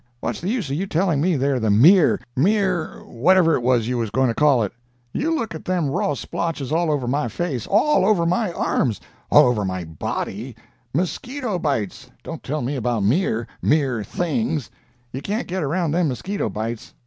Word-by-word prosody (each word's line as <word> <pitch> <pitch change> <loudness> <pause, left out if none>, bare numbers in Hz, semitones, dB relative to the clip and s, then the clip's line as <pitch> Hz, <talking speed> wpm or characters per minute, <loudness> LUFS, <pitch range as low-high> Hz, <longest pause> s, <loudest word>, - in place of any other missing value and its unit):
What's - - -4
the 180 - -2
use 225 - -1
of - - 0
you 190 +6 -2
telling 165 -4 +1
me 175 +1 +2
they're 135 -1 +1
the 110 -2 0
mere—mere—whatever 165 - +3
it - - +1
was 120 -2 +2
you 125 0 -1
was 115 -2 -1
going 130 +4 +2
to - - 0
call 140 -3 +3
it? 100 - -3 0.4
You 315 +5 0
look 230 - -3
at 160 - -8
them 175 -6 0
raw 145 - 0
splotches 150 +2 -4
all 165 +1 +1
over 145 -5 0
my 135 0 0
face—all 175 - +1
over 190 -4 +3
my 180 +3 +1
arms—all 110 - +1
over 120 -4 +1
my 95 -2 -3
body! 100 - -5 0.4
Mosquito 210 - -2
bites! 135 - -2
Don't - - -7
tell 150 0 -3
me 135 +4 -2
about 120 -4 -1
mere—mere 125 - 0
things! 165 - -2 0.4
You 130 - -5
can't 210 - -2
get 185 +1 -2
around 165 +2 0
them 170 +1 +2
mosquito 190 +10 -3
bites. 110 +1 -5
145 Hz, 170 wpm, -22 LUFS, 120-180 Hz, 0.4 s, mere—mere—whatever